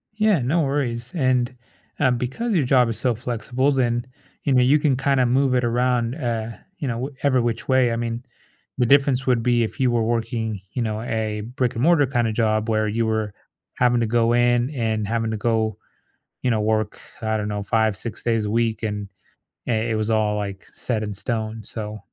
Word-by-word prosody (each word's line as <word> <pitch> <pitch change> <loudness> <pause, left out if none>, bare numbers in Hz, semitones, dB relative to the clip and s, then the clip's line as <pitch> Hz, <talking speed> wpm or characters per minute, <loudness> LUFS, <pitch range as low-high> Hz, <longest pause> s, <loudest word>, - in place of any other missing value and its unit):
Yeah, 215 -4 +3
no 155 +8 +1
worries, 130 -4 -1
and, 130 -4 +1 0.4
uh, 130 - +4
because 135 - -1
your 150 - +2
job 125 -2 +4
is 115 - -2
so 125 -2 +1
flexible, 120 +4 -1
then, 120 -3 +1 0.4
you 140 - +1
know, 125 - +5
you 140 +4 +4
can 145 -3 +2
kinda 135 -1 +2
move 130 +2 +2
it 125 - +2
around, 120 0 +1
eh, 115 -5 -3 0.2
you 140 - -3
know, 115 - -1
w 135 +3 -5
every 130 -3 +3
which 115 -1 -2
way. 130 -2 +3
I 115 - 0
mean, 115 +1 -3 0.5
the 125 - +3
difference 135 0 +3
would 125 -3 +3
be 120 -1 +3
if 110 - -5
you 130 -2 +3
were 120 -1 +1
working, 110 -2 -2
you 125 - -2
know, 110 -1 -2
a 110 -2 -2
brick 125 +2 -2
and 115 - -1
mortar 165 -4 +5
kind 120 -3 +1
of 110 - -1
job 110 -1 +1
where 110 -1 +1
you 115 +2 0
were 110 -2 -1 0.4
having 120 -1 +3
to 115 - +1
go 115 +1 +2
in 120 +1 +3
and 110 -5 -1
having 115 0 -1
to 110 - -2
go, 110 -1 0 0.7
you 125 - +2
know, 110 -2 +1
work, 110 0 0 0.2
I 110 0 0
don't 105 0 -2
know, 105 -1 -3
5, 110 0 +1
6 115 +4 -7
days 115 -3 +1
a 105 - -2
week 115 -1 0
and 105 -2 -3 0.6
i - - 0
it 110 0 0
was 110 +1 -1
all, 105 -1 +2
like, 100 -2 -4
set 110 -4 -1
in 105 -1 -4
stone, 110 +1 -3
so 105 -1 -6
120 Hz, 210 wpm, -23 LUFS, 110-125 Hz, 0.7 s, know